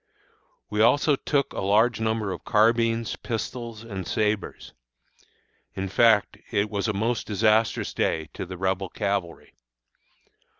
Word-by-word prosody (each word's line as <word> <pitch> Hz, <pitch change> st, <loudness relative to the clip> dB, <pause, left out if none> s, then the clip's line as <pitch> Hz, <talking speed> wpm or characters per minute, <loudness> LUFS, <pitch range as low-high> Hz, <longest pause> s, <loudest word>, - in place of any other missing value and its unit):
We 105 Hz, 0 st, +1 dB
also 140 Hz, +6 st, +4 dB
took 140 Hz, +1 st, -1 dB
a -, -, -3 dB
large 110 Hz, +5 st, +3 dB
number 110 Hz, -2 st, -1 dB
of -, -, -6 dB
carbines, 115 Hz, +1 st, +2 dB
pistols, 115 Hz, 0 st, -5 dB
and 95 Hz, -6 st, -6 dB
sabres. 105 Hz, -1 st, -2 dB, 1.0 s
In 95 Hz, 0 st, -3 dB
fact, 110 Hz, +1 st, +3 dB
it 100 Hz, +1 st, 0 dB
was 100 Hz, 0 st, -1 dB
a -, -, +1 dB
most 110 Hz, +3 st, -1 dB
disastrous 110 Hz, +2 st, +1 dB
day 80 Hz, -1 st, -1 dB
to -, -, -6 dB
the 90 Hz, 0 st, -7 dB
Rebel 95 Hz, +1 st, -1 dB
cavalry. 100 Hz, -4 st, -3 dB
110 Hz, 130 wpm, -25 LUFS, 100-115 Hz, 1.0 s, also